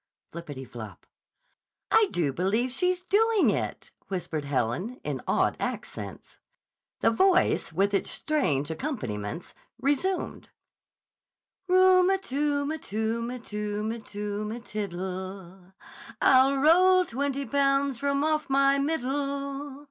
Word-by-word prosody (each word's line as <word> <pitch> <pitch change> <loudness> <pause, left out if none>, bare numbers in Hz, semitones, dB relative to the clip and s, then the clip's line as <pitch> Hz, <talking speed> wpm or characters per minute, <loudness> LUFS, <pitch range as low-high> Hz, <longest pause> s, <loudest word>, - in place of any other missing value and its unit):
(Floppity 145 -6 -7
flop!) 110 -3 -10 0.9
"I 445 -2 +5
do 150 -6 0
believe 210 - 0
she's 360 +5 +1
doing 430 +3 +3
it," - - -4 0.2
whispered 165 -6 -3
Helen 140 - -2
in - - -3
awed - - +2
accents. - - -6 0.6
The - - +4
voice, 365 - +3
with 195 +5 +1
its 195 - +1
strange 160 - 0
accompaniments, 160 - -4 0.3
resumed: 290 +8 -1 1.2
"Ru 370 0 +5
m 385 0 +2
tu 285 -3 -1
m 310 +2 -3
tu 225 +1 -2
m 250 0 -5
tum - - -16
tu 210 -1 -3
m 230 0 -6
tu 210 0 -4
m 235 +2 -6
tiddle, 190 -2 -6 0.5
I'll 270 +1 +5
roll 365 +5 +5
twenty 280 +1 -2
pounds 275 0 +1
from 280 0 0
off 310 -1 0
my 275 +1 +4
middle. 280 -1 -2
260 Hz, 120 wpm, -27 LUFS, 195-290 Hz, 1.2 s, I